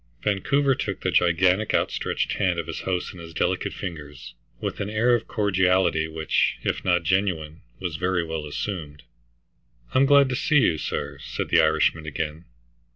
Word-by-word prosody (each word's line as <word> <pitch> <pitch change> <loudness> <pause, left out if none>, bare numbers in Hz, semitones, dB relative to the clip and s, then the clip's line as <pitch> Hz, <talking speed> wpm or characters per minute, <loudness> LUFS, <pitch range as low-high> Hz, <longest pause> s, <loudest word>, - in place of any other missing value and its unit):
Vancouver 135 +8 +2
took - - -4
the - - 0
gigantic 90 +4 +3
outstretched - - -1
hand 90 -4 0
of 85 - -2
his 80 -1 -5
host 90 -1 -2
in 90 - -12
his 80 -1 -10
delicate - - 0
fingers, 75 -5 -8 0.3
with - - -4
an 100 - -2
air 115 +3 +2
of 120 - 0
cordiality 95 -6 +2
which, 80 -1 0
if - - -1
not 90 -2 +2
genuine, 85 -3 -1 0.2
was 90 -4 -4
very 90 0 0
well 80 -2 -4
assumed. 75 -3 -5 0.9
"I'm 135 +1 +4
glad 140 -1 +6
to 125 - -1
see 150 +4 +2
you, 85 - +3
sir," 70 -1 -4
said - - -4
the - - +5
Irishman 80 0 +2
again. 75 +2 -4
90 Hz, 165 wpm, -24 LUFS, 80-100 Hz, 0.9 s, glad